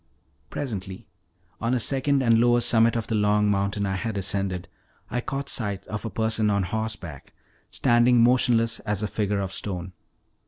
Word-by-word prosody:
Presently, 95 Hz, -8 st, -6 dB, 0.5 s
on 115 Hz, +3 st, 0 dB
a -, -, +1 dB
second 135 Hz, +3 st, +1 dB
and 115 Hz, -2 st, +4 dB
lower 120 Hz, 0 st, +4 dB
summit 115 Hz, -1 st, +3 dB
of 115 Hz, -2 st, -2 dB
the -, -, -4 dB
long 105 Hz, 0 st, +2 dB
mountain 100 Hz, +1 st, -1 dB
I 95 Hz, -1 st, -1 dB
had 110 Hz, 0 st, -3 dB
ascended, 95 Hz, -2 st, -2 dB, 0.4 s
I 125 Hz, -, -1 dB
caught 140 Hz, +2 st, -4 dB
sight 100 Hz, -7 st, -2 dB
of 105 Hz, +2 st, -6 dB
a -, -, -2 dB
person 110 Hz, -1 st, +1 dB
on 100 Hz, -1 st, +1 dB
horseback, 100 Hz, -7 st, -5 dB, 0.4 s
standing 120 Hz, 0 st, +3 dB
motionless 120 Hz, -2 st, +3 dB
as 105 Hz, -1 st, -3 dB
a -, -, 0 dB
figure 105 Hz, 0 st, -1 dB
of 95 Hz, -1 st, -4 dB
stone. 90 Hz, -2 st, -4 dB
110 Hz, 165 wpm, -25 LUFS, 100-120 Hz, 0.5 s, and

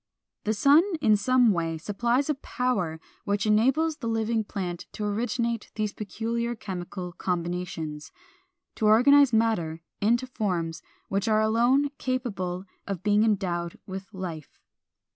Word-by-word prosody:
The 215 Hz, +1 st, +1 dB
sun 285 Hz, +8 st, +6 dB, 0.2 s
in 215 Hz, -6 st, +4 dB
some 245 Hz, +2 st, +4 dB
way 165 Hz, -3 st, -1 dB
supplies 235 Hz, -, 0 dB
a 305 Hz, -, +2 dB
power 245 Hz, -, -2 dB, 0.2 s
which 200 Hz, 0 st, 0 dB
enables 265 Hz, +9 st, +3 dB
the 235 Hz, -, -5 dB
living 225 Hz, 0 st, 0 dB
plant 185 Hz, -4 st, -5 dB
to 210 Hz, -, -4 dB
originate 230 Hz, +2 st, -1 dB
these 215 Hz, -1 st, -1 dB
peculiar 235 Hz, +3 st, -3 dB
chemical 180 Hz, -3 st, -6 dB
combinations, 170 Hz, -4 st, -3 dB, 0.7 s
to 215 Hz, -, +2 dB
organize 270 Hz, +5 st, +6 dB
matter 210 Hz, -8 st, +1 dB, 0.2 s
into 235 Hz, +5 st, +2 dB
forms 180 Hz, -10 st, -2 dB, 0.3 s
which 195 Hz, +1 st, -1 dB
are 215 Hz, -1 st, +3 dB
alone 240 Hz, +6 st, +3 dB
capable 200 Hz, -8 st, -2 dB, 0.2 s
of 195 Hz, -3 st, -4 dB
being 210 Hz, 0 st, +4 dB
endowed 180 Hz, -6 st, 0 dB
with 190 Hz, +2 st, -7 dB
life. 175 Hz, -6 st, -7 dB
215 Hz, 130 wpm, -27 LUFS, 180-235 Hz, 0.7 s, sun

